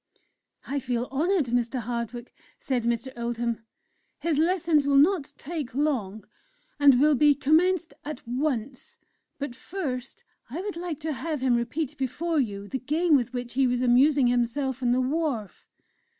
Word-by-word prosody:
"I 280 +1 -2
feel 245 -1 -2
honoured, 300 -2 +1
Mr. 245 +1 0
Hardwick," 240 0 -4 0.2
said 250 -4 -2
Mr. 235 +2 0
Oldham; 235 -1 -2 0.6
"his 320 -3 0
lessons 325 -3 +2
will 280 -1 +4
not 315 +1 +3
take 295 -5 -5
long, 220 -9 -1 0.5
and 280 -3 +6
will 300 +2 +5
be 290 +1 +5
commenced 320 +3 +2
at 290 -5 -7
once. 260 - -3 0.4
But 285 -3 -4
first, 270 -4 -5 0.3
I 290 +8 -5
would 405 -1 -4
like 340 -3 -4
to 310 0 -2
have 305 0 -3
him 255 -2 +3
repeat 255 +5 -2
before 300 +5 -1
you 205 -6 -2
the 265 - -3
game 310 +5 +2
with 250 -2 +1
which 245 -1 -5
he 265 0 +3
was 245 0 0
amusing 265 +3 +4
himself 245 +2 0
on 245 -1 +2
the 250 - +3
wharf." 265 - -2
Mr. 475 - -45
270 Hz, 160 wpm, -26 LUFS, 240-310 Hz, 0.6 s, and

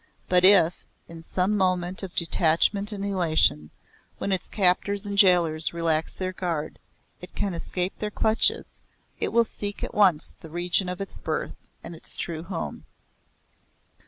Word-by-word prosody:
But 180 0 +4
if, 185 -3 +5 0.2
in 165 -1 -11
some 185 +5 0
moment 185 -2 0
of 190 -2 -8
detachment 170 +5 +1
and 200 -1 -4
elation, 160 - +1 0.5
when 200 - -3
its 190 - -2
captors 200 +1 +1
and 200 0 -4
jailors 170 -5 +3
relax 165 -1 -1
their 185 0 -4
guard, 165 -4 -4 0.4
it 180 - -12
can 200 -2 -2
escape 180 +2 -3
their 210 - -2
clutches, 220 +1 +1 0.4
it - - -1
will 235 0 +4
seek 205 -2 -6
at - - -4
once 185 -7 +4
the 160 - -11
region 175 +3 0
of 180 +2 -5
its 195 - -7
birth - - -3 0.3
and 170 - -8
its 160 - -3
true 160 -2 -4
home." 170 0 -6
180 Hz, 155 wpm, -25 LUFS, 165-200 Hz, 0.5 s, if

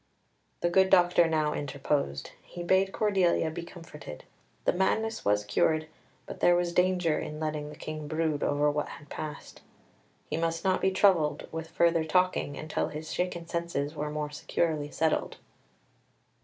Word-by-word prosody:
The 175 - +2
good 190 +1 +4
doctor 175 -2 +5
now 155 -2 +1
interposed; 140 - -2
he 175 - -8
bade 190 +2 +3
Cordelia 190 -7 +2
be 170 +2 -5
comforted: 165 - -10 0.4
the - - +3
madness 220 +5 0
was 105 0 +2
cured, 155 +9 +2 0.4
but - - -8
there 175 - +5
was 175 0 0
danger 180 -3 +2
in 150 0 -6
letting 155 -1 -3
the 150 - -9
King 155 -1 -6
brood 155 -1 -1
over 145 +1 +2
what 150 0 -2
had 145 - -11
passed. 155 -1 -7 0.7
He - - -2
must 165 +1 -1
not 190 -1 +2
be 190 - +3
troubled 185 -5 +3
with 160 0 -5
further 170 -1 +3
talking 180 -3 +1
until 155 0 -2
his 155 +1 -6
shaken 180 -1 -2
senses 170 -4 -2
were 150 -1 -3
more 150 0 -3
securely 150 0 -1
settled. 160 +1 0
160 Hz, 155 wpm, -29 LUFS, 150-175 Hz, 0.7 s, doctor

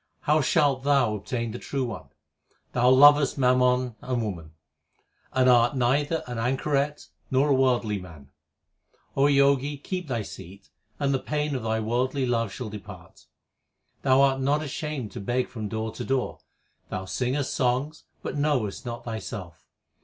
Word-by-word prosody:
HYMNS 150 +2 +2
OF 140 -4 +3
GURU 140 +1 +3
NANAK 110 -7 0 0.4
351 130 -4 -3 0.7
Thou 125 +1 +3
lovest 145 +2 +6
mammon 125 -2 +2
and 125 -2 -2
woman, 85 -7 -6 0.8
And 130 -1 +3
art 120 +1 +5
neither 145 +6 +1
an 120 -2 -5
anchoret 140 +4 -1 0.2
nor 135 +2 +2
a - - +5
worldly 125 -6 +2
man. 80 -7 -13 0.8
Jogi, 140 0 +3
keep 180 +4 -5
thy 120 -5 -2
seat, 95 -5 -11 0.3
1 145 - -2
and 140 - +2
the 135 - +1
pain 150 +1 -2
of 130 - -2
thy 110 0 -1
worldly 130 +4 0
love 115 -4 0
shall 110 +3 -6
depart. 105 -3 -11 0.7
Thou 130 +1 +4
art 135 -1 +3
not 145 +3 +1
ashamed 150 -5 -4
to - - -7
beg 120 +5 -1
from 110 -4 -6
door 110 0 -3
to 110 - -6
door; 135 -1 -1 0.5
Thou 95 0 -4
singest 130 +7 -1
songs, 130 +4 -1 0.2
but - - -4
knowest 140 -8 -1
not 120 0 -6
thyself. 95 -6 -7
130 Hz, 150 wpm, -26 LUFS, 115-140 Hz, 0.8 s, lovest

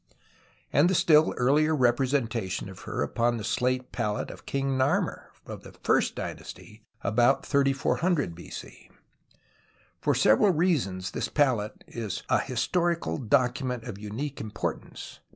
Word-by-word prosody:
and 155 +5 +5
the 190 - +1
still 155 -2 +5
earher 150 +4 +2
representation 120 -6 0
of 95 - -11
her - - -1
upon 120 +9 0
the 110 - -5
slate 125 +3 -1
palette 105 0 -2
of - - -14
King 135 0 -1
xS^armer 130 0 0 0.2
of - - -8
the - - -13
first - - +2
dynasty, 110 +1 -8 0.2
about 120 +6 +3
3400 140 - +1
B.C. 85 +1 -10 1.1
For - - +1
several 110 - +5
reasons 150 - 0
this - - -2
palette 125 -8 0
is 110 -5 -5
a - - +4
historical 170 -2 -1
document 125 0 0
of 115 -5 -7
unique 120 +8 -5
importance. 110 -1 -5
125 Hz, 130 wpm, -27 LUFS, 110-145 Hz, 1.1 s, and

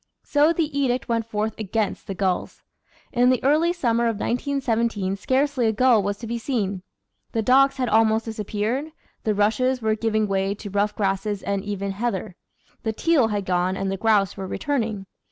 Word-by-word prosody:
So 295 +2 +3
the 315 -3 -1
edict 255 -3 0
went 230 -2 -1
forth 215 0 -2
against 215 0 -2
the 195 - -4
gulls. 185 -1 -2 0.5
In 245 -1 +4
the 255 - +1
early 310 +5 +3
summer 235 -9 +1
of 230 -1 +1
1917 230 -5 -1
scarcely 260 +2 +1
a - - +3
gull 235 0 +4
was 200 +1 -2
to 230 - -8
be 235 +1 -3
seen; 205 -7 -2 0.5
the 225 - 0
docks 275 +4 +4
had 255 -2 0
almost 220 0 +3
disappeared; 220 +7 -3 0.3
the 215 -1 +1
rushes 225 +6 +2
were 220 -2 +1
giving 215 -1 0
way 195 0 0
to 205 -1 -8
rough 205 +1 0
grasses 195 0 -1
and 200 -1 -2
even 200 -1 -3
heather; 195 -3 -3 0.5
the 220 - -2
teal 290 -1 +3
had 205 -2 -2
gone 185 +1 0
and 195 0 -2
the - - -1
grouse 205 -2 +2
were 195 -1 -5
returning. 225 -6 -2
220 Hz, 180 wpm, -23 LUFS, 200-250 Hz, 0.5 s, In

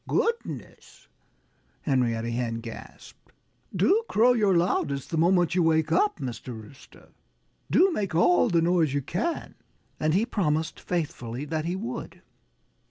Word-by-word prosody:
"Goodness!" 465 +1 -3 0.8
Henrietta 120 -5 0
Hen 115 -1 -2
gasped. 115 -1 -11 0.4
"Do 440 +4 +3
crow 240 +4 +4
your 205 -6 +3
loudest 140 -5 -1
the 165 - -1
moment 175 0 +3
you 180 - +2
wake 160 -1 +2
up, 195 +5 +2
Mr. 125 -4 -6
Rooster! 110 +5 -16 0.6
Do 380 +2 +4
make 200 - -2
all 175 +7 +4
the 170 -4 +2
noise 165 -5 +2
you 140 - 0
can!" 225 - -3 0.5
And 155 +1 +1
he 210 +4 +3
promised 160 -8 -1
faithfully 140 -7 -4
that 155 +1 -3
he 175 +2 -1
would. 215 +5 -6
165 Hz, 135 wpm, -26 LUFS, 135-190 Hz, 0.8 s, crow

